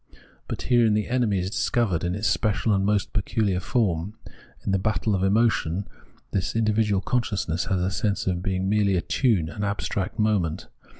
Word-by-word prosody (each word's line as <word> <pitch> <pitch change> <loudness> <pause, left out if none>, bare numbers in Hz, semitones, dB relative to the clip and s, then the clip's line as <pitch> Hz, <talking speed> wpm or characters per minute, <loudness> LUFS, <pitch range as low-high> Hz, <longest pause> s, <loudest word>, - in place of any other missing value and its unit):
But - - -5
herein 120 -3 +3
the 105 - 0
enemy 120 -5 +1
is 95 +1 -2
discovered 105 -7 0
in 90 +1 -1
its 105 +1 -1
special 110 +1 +1
and 95 -1 +2
most 105 0 0
pecuhar 100 -2 0
form. 100 -4 0 0.5
In - - 0
the 95 - +2
battle 110 +2 0
of 95 - 0
emotion 100 -3 +1 0.4
this 95 - -1
individual 110 -3 +2
consciousness 100 -9 -1
has 95 -2 0
the 90 +2 0
sense 100 +1 -1
of 90 -2 -1
being 95 0 -1
merely 100 -1 +2
a 90 - +1
tune, 105 - +1
an 105 +5 -5
abstract 100 -1 -2
moment. 105 -7 0
100 Hz, 175 wpm, -25 LUFS, 95-110 Hz, 0.5 s, herein